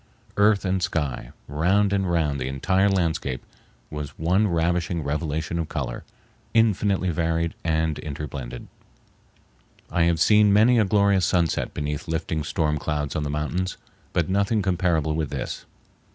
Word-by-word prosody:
Earth 105 Hz, -1 st, +3 dB
and 95 Hz, 0 st, 0 dB
sky, 75 Hz, -8 st, -2 dB, 0.2 s
round 95 Hz, +8 st, +2 dB
and 95 Hz, -3 st, 0 dB
round 75 Hz, -5 st, +1 dB
the 65 Hz, -, -2 dB
entire 95 Hz, +9 st, +1 dB
landscape, 80 Hz, -8 st, -1 dB, 0.5 s
was 75 Hz, -2 st, -6 dB
one 90 Hz, +7 st, +2 dB
ravishing 85 Hz, -1 st, 0 dB
revelation 75 Hz, +3 st, -2 dB
of 80 Hz, -2 st, -3 dB
color, -, -, -4 dB, 0.5 s
infinitely 100 Hz, -4 st, +2 dB
varied 85 Hz, 0 st, 0 dB
and 80 Hz, -1 st, 0 dB
interblended. 70 Hz, -4 st, -6 dB, 1.3 s
I 85 Hz, -, +3 dB
have 85 Hz, -1 st, +1 dB
seen 105 Hz, +3 st, +5 dB
many 115 Hz, +4 st, +5 dB
a 110 Hz, -, +4 dB
glorious 100 Hz, -2 st, +3 dB
sunset 85 Hz, -3 st, 0 dB
beneath 75 Hz, -1 st, -3 dB
lifting 80 Hz, -1 st, -2 dB
storm 75 Hz, -1 st, 0 dB
clouds 75 Hz, -1 st, -2 dB
on 75 Hz, -, 0 dB
the 75 Hz, -, -2 dB
mountains, 80 Hz, +6 st, -2 dB, 0.3 s
but 85 Hz, -, 0 dB
nothing 100 Hz, +2 st, +1 dB
comparable 85 Hz, -5 st, +1 dB
with 80 Hz, -2 st, -2 dB
this. -, -, -5 dB
85 Hz, 140 wpm, -24 LUFS, 75-95 Hz, 1.3 s, seen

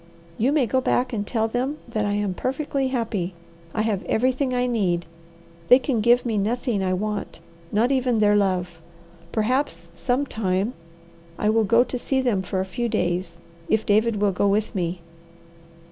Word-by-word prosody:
You 245 Hz, +5 st, +3 dB
may 295 Hz, -4 st, +3 dB
go 260 Hz, +3 st, +1 dB
back 250 Hz, 0 st, +1 dB
and 205 Hz, -2 st, -2 dB
tell 225 Hz, -3 st, 0 dB
them 255 Hz, +6 st, -2 dB
that 220 Hz, -3 st, -1 dB
I 205 Hz, -, 0 dB
am 205 Hz, -2 st, -1 dB
perfectly 270 Hz, +4 st, -1 dB
happy. 220 Hz, -8 st, -2 dB, 0.4 s
I 215 Hz, -, -1 dB
have 210 Hz, -4 st, 0 dB
everything 255 Hz, +3 st, +1 dB
I 250 Hz, 0 st, +1 dB
need. 190 Hz, -8 st, 0 dB, 0.6 s
They 250 Hz, -, +8 dB
can 260 Hz, -4 st, -1 dB
give 240 Hz, +3 st, +4 dB
me 220 Hz, -3 st, 0 dB
nothing 230 Hz, +1 st, 0 dB
I 185 Hz, -, 0 dB
want, 205 Hz, +2 st, -3 dB, 0.3 s
not 230 Hz, +5 st, +2 dB
even 255 Hz, -3 st, +2 dB
their 210 Hz, -1 st, +4 dB
love. 180 Hz, -4 st, 0 dB, 0.5 s
Perhaps, 255 Hz, +6 st, -1 dB
sometime, 225 Hz, -5 st, -1 dB, 0.6 s
I 210 Hz, -, +2 dB
will 225 Hz, 0 st, +3 dB
go 230 Hz, +4 st, +5 dB
to 250 Hz, 0 st, -5 dB
see 265 Hz, +2 st, 0 dB
them 240 Hz, -7 st, +1 dB
for 190 Hz, 0 st, -3 dB
a 190 Hz, -, 0 dB
few 235 Hz, +5 st, -3 dB
days, 175 Hz, -3 st, -1 dB, 0.3 s
if 220 Hz, 0 st, +2 dB
David 215 Hz, +2 st, +3 dB
will 205 Hz, -1 st, +2 dB
go 195 Hz, +2 st, +1 dB
with 205 Hz, +2 st, +1 dB
me." 175 Hz, -2 st, -2 dB
220 Hz, 175 wpm, -24 LUFS, 200-250 Hz, 0.6 s, They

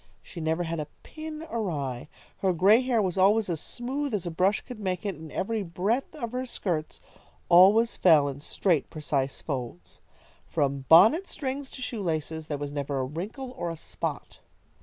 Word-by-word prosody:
She 170 Hz, -, -9 dB
never 160 Hz, +2 st, 0 dB
had 165 Hz, -1 st, -3 dB
a 150 Hz, -, -4 dB, 0.2 s
pin 310 Hz, 0 st, -7 dB
awry. 150 Hz, -, -3 dB, 0.3 s
Her 190 Hz, -2 st, +2 dB
gray 200 Hz, +8 st, +5 dB
hair 245 Hz, -4 st, +1 dB
was 185 Hz, 0 st, -1 dB
always 205 Hz, +2 st, +4 dB
as 165 Hz, -3 st, -2 dB
smooth 265 Hz, +1 st, -3 dB
as 190 Hz, -3 st, -3 dB
a 175 Hz, -, -3 dB
brush 185 Hz, +5 st, +2 dB
could 250 Hz, -3 st, -10 dB
make 185 Hz, -2 st, -3 dB
it, 200 Hz, -, -1 dB
and 160 Hz, -2 st, -11 dB
every 220 Hz, +3 st, -1 dB
breadth 200 Hz, -, -1 dB
of 235 Hz, -7 st, -5 dB
her 255 Hz, +1 st, -3 dB
skirts 165 Hz, -9 st, -3 dB, 0.5 s
always 200 Hz, +7 st, +6 dB
fell 155 Hz, -5 st, +5 dB
in 140 Hz, 0 st, -5 dB
straight, 160 Hz, +1 st, 0 dB
precise 140 Hz, -3 st, -2 dB
folds. 120 Hz, -, -6 dB, 0.5 s
From 140 Hz, -1 st, -1 dB
bonnet 225 Hz, -, +7 dB
strings 270 Hz, 0 st, -4 dB
to 255 Hz, -, -7 dB
shoe 235 Hz, -4 st, -3 dB
laces 160 Hz, -2 st, -3 dB
there 145 Hz, -, -2 dB
was 145 Hz, 0 st, -5 dB
never 140 Hz, -1 st, -3 dB
a 130 Hz, -, 0 dB
wrinkle 205 Hz, -, -6 dB
or 175 Hz, -9 st, -4 dB
a 165 Hz, -, -5 dB
spot. -, -, -5 dB
180 Hz, 180 wpm, -27 LUFS, 155-230 Hz, 0.5 s, bonnet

